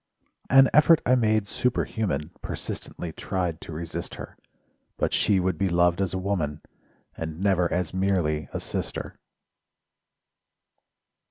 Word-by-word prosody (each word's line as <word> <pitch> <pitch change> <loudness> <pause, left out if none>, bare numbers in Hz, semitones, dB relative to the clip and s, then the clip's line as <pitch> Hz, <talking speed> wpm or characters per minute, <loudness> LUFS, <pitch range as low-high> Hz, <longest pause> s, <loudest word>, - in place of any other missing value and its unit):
An 135 +1 +7
effort 155 +2 +6
I 125 - +4
made 110 -4 +2
superhuman— 95 - -1
Persistently 85 - -5
tried 90 -3 -3
to - - -9
resist 85 +2 -5
her: - - -9 0.6
But - - 0
she 100 -2 +3
would 90 -3 -1
be 95 - +2
loved 85 +1 +3
as 95 -1 -1
a - - 0
woman, 90 -6 -2 0.5
And 80 0 -5
never 95 -3 +2
as 90 0 -1
merely 90 -6 0
a - - -3
sister. - - -5
90 Hz, 125 wpm, -26 LUFS, 85-100 Hz, 0.6 s, An